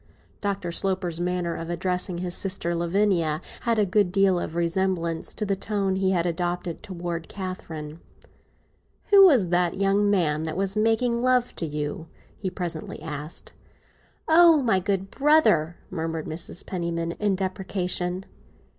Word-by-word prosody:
Dr. 195 -4 -2
Sloper's 185 -2 0
manner 175 -1 -1
of 165 0 -6
addressing 180 +1 -1
his 175 0 -3
sister 185 -3 +1
Lavinia 170 -2 +1 0.3
had 230 -1 +2
a 210 - +3
good 195 -1 +2
deal 195 -2 +3
of 165 - -5
resemblance 170 -1 -1
to 215 - -2
the 200 -1 0
tone 195 -1 -1
he 190 0 +1
had 175 -3 +1
adopted 175 0 -2
towards 170 -3 -5
Catherine. 165 -5 -7 1.1
"Who 400 -1 +9
was 240 - +4
the 175 0 +3
young 200 +1 +2
man 160 -7 +2
that 160 +1 -4
was 195 +1 0
making 225 +2 +1
love 250 -1 +2
to 165 - -2
you?" 150 +2 -4 0.3
he 195 - -4
presently 175 -3 -4
asked. 150 0 -7 0.7
"Oh, 325 -2 +6
my 220 -6 +3
good 195 0 -2
brother!" 275 - +3
murmured 160 -2 -3
Mrs. 165 +2 -5
Penniman, 170 -2 -3
in 205 -2 +1
deprecation. 185 -1 -2
180 Hz, 145 wpm, -25 LUFS, 170-200 Hz, 1.1 s, Who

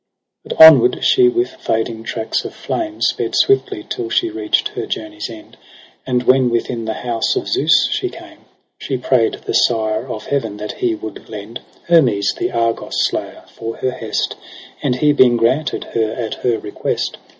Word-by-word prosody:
8 - - -15
But 160 - +11
onward 160 - +6
she 375 -2 +5
with 360 +1 -1
fading 110 - -2
tracks 110 -1 -2
of - - -8
flame 325 -1 -4
Sped - - 0
swiftly, 400 0 +1
till 370 -2 -4
she 345 -1 +1
reacht 360 0 0
her - - -5
journey's 320 0 -5
end: 325 0 -12 0.5
And 125 -1 0
when 130 0 +4
within 120 0 -2
the 110 0 -3
house 115 -2 0
of - - -2
Zeus - - +3
she - - -1
came, - - -13 0.4
She 130 - -3
pray'd 125 -2 +1
the - - -3
Sire 110 +1 +1
of 110 -4 -6
Heaven 115 -7 -2
that 105 0 -7
he 115 -2 +1
would 110 -1 -9
lend 110 +2 -8 0.3
Hermes, 130 -12 +3
the - - -2
Argus 115 -1 -1
slayer, - - -4
for 115 0 -7
her 130 - -1
hest - - -3
j - - -8 0.4
And 135 -4 0
he 150 +3 +3
being 125 -4 +5
granted 130 +7 0
her 110 -1 0
at 115 -2 -4
her 120 -2 +2
request. 105 - -3
125 Hz, 180 wpm, -18 LUFS, 115-160 Hz, 0.5 s, But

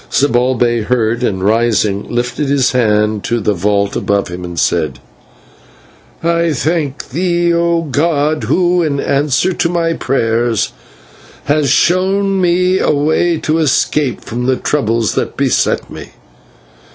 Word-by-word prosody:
Zibalbay 120 -3 +1
heard, 120 -1 0
and, 95 -6 -1
rising, 110 -2 +1
lifted 125 +4 -2
his 140 -3 +2
hand 105 -3 +1
to 120 - 0
the 105 -1 0
vault 100 +2 0
above 100 -2 -1
him, 90 +1 -7
and 90 -1 -7
said: 75 -6 0 1.3
"I 170 -1 +1
thank 150 0 -2
thee, 170 +3 0
O 170 0 +1
god, 150 0 0
who, 180 -1 +2
in 145 -4 -1
answer 140 +6 +1
to 170 - 0
my 170 -1 0
prayers, 115 - 0 0.7
hast 145 -1 +1
shown 190 +5 +2
me 180 +1 +2
a - - +1
way 155 +4 +1
of 155 +1 +1
escape 150 -2 0
from 125 +2 -3
the 130 - +2
troubles 115 -7 -1
that - - -3
beset - - 0
me. - - -9
135 Hz, 135 wpm, -14 LUFS, 115-165 Hz, 1.3 s, his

